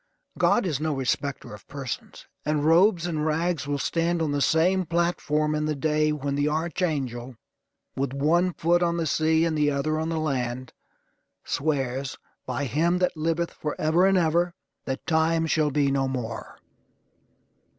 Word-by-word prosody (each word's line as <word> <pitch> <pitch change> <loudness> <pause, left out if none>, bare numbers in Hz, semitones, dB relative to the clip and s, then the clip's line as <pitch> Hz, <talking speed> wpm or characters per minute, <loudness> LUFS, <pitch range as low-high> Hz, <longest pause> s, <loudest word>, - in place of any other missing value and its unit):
God 240 - +3
is 155 -7 -1
no 155 -1 -1
respecter 135 -1 -2
of 105 - -13
persons; 135 -4 -6 0.2
and 150 -1 0
robes 175 +2 +4
and 160 -3 -2
rags 160 -2 0
will 145 0 0
stand 170 +4 0
on 160 -3 0
the 145 0 0
same 175 +7 +3
platform 160 -3 0
in 150 0 0
the 155 0 -1
day 155 +1 +1
when 140 -2 -2
the 145 +1 +1
archangel, 145 -6 -2 0.6
with 135 -1 -1
one 165 +7 +2
foot 175 +2 +2
on 170 -1 +1
the 165 - 0
sea 160 +2 +2
and 165 -1 0
the 150 -1 +2
other 150 +2 0
on 160 +1 -2
the 165 - -1
land, 130 -4 -2 0.7
swears, 135 -3 -1 0.3
by 140 - -2
Him 165 +8 +1
that 180 -1 0
liveth 165 +2 -1
forever 155 +4 +1
and 195 -1 +3
ever, 170 +1 +1 0.3
that 130 0 -4
Time 160 0 +2
shall 155 -1 +2
be 145 -1 +1
no 135 -1 +1
more. 125 -3 -5
155 Hz, 160 wpm, -26 LUFS, 140-165 Hz, 0.7 s, robes